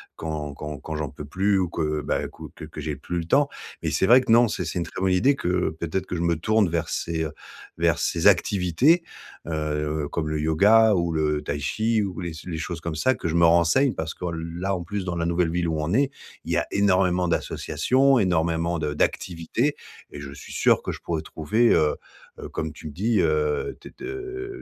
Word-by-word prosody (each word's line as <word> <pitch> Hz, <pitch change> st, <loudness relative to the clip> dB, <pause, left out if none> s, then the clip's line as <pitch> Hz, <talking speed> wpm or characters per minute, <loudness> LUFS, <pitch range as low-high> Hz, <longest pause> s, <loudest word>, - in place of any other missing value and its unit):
quand 75 Hz, -3 st, -5 dB
quand 75 Hz, -2 st, -6 dB
quand 80 Hz, +2 st, -6 dB
j'en 75 Hz, -3 st, -3 dB
peux 75 Hz, -, -9 dB
plus 95 Hz, +5 st, +1 dB
ou 90 Hz, -2 st, 0 dB
que, 75 Hz, -3 st, -1 dB
bah, -, -, -1 dB, 0.3 s
que 80 Hz, -, -8 dB
que 75 Hz, 0 st, -9 dB
j'ai 75 Hz, -1 st, -3 dB
plus 85 Hz, +5 st, -4 dB
le 85 Hz, -, -4 dB
temps 140 Hz, -, +3 dB, 0.3 s
et -, -, 0 dB
c'est 95 Hz, -, +2 dB
vrai 125 Hz, +2 st, +7 dB
que 115 Hz, -, -1 dB
non, 120 Hz, +1 st, +6 dB
c'est -, -, -3 dB
c'est 90 Hz, -, -3 dB
une 85 Hz, -, -2 dB
très -, -, -8 dB
bonne 95 Hz, -1 st, +1 dB
idée 135 Hz, +10 st, +3 dB
que 90 Hz, -5 st, 0 dB
peut-être 90 Hz, +3 st, -2 dB
que 90 Hz, -, -4 dB
je 85 Hz, -, -2 dB
me 85 Hz, 0 st, +2 dB
tourne 110 Hz, +4 st, +2 dB
vers 80 Hz, -1 st, -2 dB
ces 80 Hz, -1 st, -2 dB, 0.5 s
vers -, -, +2 dB
ces -, -, -1 dB
activités, 110 Hz, -, +4 dB, 0.4 s
heu, 75 Hz, -1 st, -2 dB
comme 80 Hz, -2 st, -2 dB
le 75 Hz, 0 st, -1 dB
yoga 105 Hz, +8 st, +5 dB
ou 85 Hz, -1 st, 0 dB
le 75 Hz, -1 st, 0 dB
Tai 70 Hz, -, -3 dB
Chi 110 Hz, +8 st, 0 dB
ou 95 Hz, -2 st, -4 dB
les 85 Hz, -2 st, -4 dB
s 80 Hz, +2 st, -10 dB
les 85 Hz, -3 st, -4 dB
choses 80 Hz, +1 st, -5 dB
comme 85 Hz, -2 st, -4 dB
ça 130 Hz, +11 st, +2 dB
que 85 Hz, -, -4 dB
je 80 Hz, -, -1 dB
me 85 Hz, 0 st, +5 dB
renseigne 85 Hz, -, +4 dB
parce 80 Hz, 0 st, -4 dB
que 90 Hz, -, -6 dB, 0.3 s
là, 95 Hz, +1 st, 0 dB
en 90 Hz, -, -4 dB
plus, 95 Hz, +2 st, -4 dB
dans 90 Hz, -1 st, -2 dB
la 85 Hz, 0 st, -1 dB
nouvelle 85 Hz, -1 st, +1 dB
ville 85 Hz, 0 st, 0 dB
où 80 Hz, -1 st, -1 dB
on 75 Hz, +5 st, -1 dB
est, 135 Hz, +3 st, +3 dB, 0.4 s
il -, -, -4 dB
y -, -, +2 dB
a -, -, +1 dB
énormément 90 Hz, -3 st, +2 dB
d'associations, 130 Hz, +9 st, +2 dB
énormément 85 Hz, -3 st, +1 dB
de 75 Hz, -1 st, -2 dB
d'activités 95 Hz, -, -1 dB, 0.3 s
et -, -, -9 dB
je 70 Hz, -1 st, -8 dB
suis 70 Hz, -, -11 dB
sûr -, -, +3 dB
que -, -, -4 dB
je -, -, -7 dB
pourrais 80 Hz, -2 st, -3 dB
trouver, 95 Hz, +11 st, +1 dB
heu 75 Hz, -1 st, +2 dB, 0.4 s
heu, -, -, -7 dB
comme 80 Hz, -, -4 dB
tu 75 Hz, -, -14 dB
me -, -, -7 dB
dis, 105 Hz, +7 st, +1 dB
heu, 75 Hz, -2 st, 0 dB
t -, -, -10 dB
de, -, -, -8 dB
heu, 390 Hz, 0 st, -6 dB
85 Hz, 230 wpm, -24 LUFS, 80-100 Hz, 0.5 s, vrai